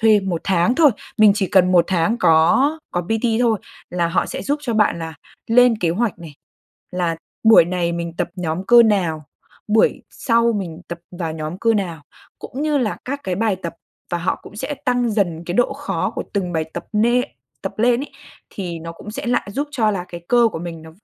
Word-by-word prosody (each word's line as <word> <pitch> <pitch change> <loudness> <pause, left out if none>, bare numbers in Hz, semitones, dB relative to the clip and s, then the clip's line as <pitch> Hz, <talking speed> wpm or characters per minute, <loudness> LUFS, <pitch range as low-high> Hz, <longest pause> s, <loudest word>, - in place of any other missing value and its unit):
thuê 220 -2 +5
một 180 -4 -2
tháng 190 +5 +2
thôi. 300 -2 +6 0.3
Mình 215 -2 +7
chỉ 200 -3 0
cần 185 -1 +4
một 175 -1 +5
tháng 185 +5 +1
có 260 - +4
có 175 - -1
PT 225 +4 0
thôi 225 -4 +2 0.3
là 175 -1 0
họ 170 - +1
sẽ - - -5
giúp 290 +1 -1
cho 240 -5 -2
bạn 210 -5 +2
là 160 -1 -6 0.3
lên 245 0 +5
kế 170 -2 +1
hoạch 210 +1 -1
này, 160 -4 -11 0.6
là 175 -2 -1 0.3
buổi 220 -6 +8
này 175 -1 -1
mình 170 -1 -4
tập - - -1
nhóm 175 +1 -3
cơ 240 -1 +8
nào, 175 -8 +1 0.4
buổi 215 +1 +3
sau 235 -1 +2
mình 180 -5 -4
tập 170 0 -5 0.2
vào 165 -3 -2
nhóm 155 +3 -5
cơ 230 0 +2
nào, 170 -7 -2 0.4
cũng 275 +4 -6
như 300 -2 +1
là 225 -5 -1
các 280 +2 -4
cái 185 -2 -1
bài 210 -1 0
tập 170 -3 -6 0.4
và 175 - -1
họ 175 - -1
cũng 205 - -13
sẽ 265 +6 -3
tăng 245 -2 +1
dần 175 -6 -1
cái 175 - -3
độ 245 - +2
khó - - -2
của - - -3
từng 185 -4 -2
bài 160 -1 0
tập - - -5
nê 235 +4 +3 0.4
tập - - -5
lên 240 +2 +3
ấy, 285 - -6 0.4
thì 175 -4 -5
nó 165 +1 -7
cũng 210 +5 -10
sẽ 225 - -6
lại 240 -4 0
giúp 290 +4 -2
cho 225 -7 +1
là 180 -3 -3
cái 175 -1 -8
cơ 240 -1 +5
của - - -4
mình 165 -1 -7
nó 160 - -12
195 Hz, 220 wpm, -20 LUFS, 170-235 Hz, 0.6 s, buổi